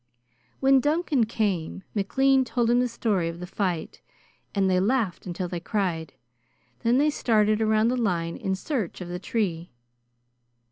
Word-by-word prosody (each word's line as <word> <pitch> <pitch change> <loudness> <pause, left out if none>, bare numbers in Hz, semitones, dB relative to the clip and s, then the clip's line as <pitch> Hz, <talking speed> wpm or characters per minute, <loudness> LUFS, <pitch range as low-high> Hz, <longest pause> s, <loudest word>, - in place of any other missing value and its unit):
When 270 0 +5
Duncan 290 -4 +1
came, 195 -6 -2
McLean 265 +6 +3
told 240 -1 0
him 245 - +4
the 250 - +2
story 210 -7 0
of 170 +1 -7
the 180 - -5
fight, 180 -3 -3 0.5
and 195 -1 +2
they 185 -1 +3
laughed 205 -3 0
until 180 +1 -3
they 175 0 -4
cried. 170 -6 -2 0.7
Then 235 +2 +2
they 300 +2 +3
started 215 -5 +2
around 220 +1 +3
the 250 - +1
line 175 -7 -1
in 190 0 -2
search 220 - -3
of 180 -2 -7
the 180 0 -4
tree. 180 -6 -2
210 Hz, 155 wpm, -26 LUFS, 180-240 Hz, 0.7 s, When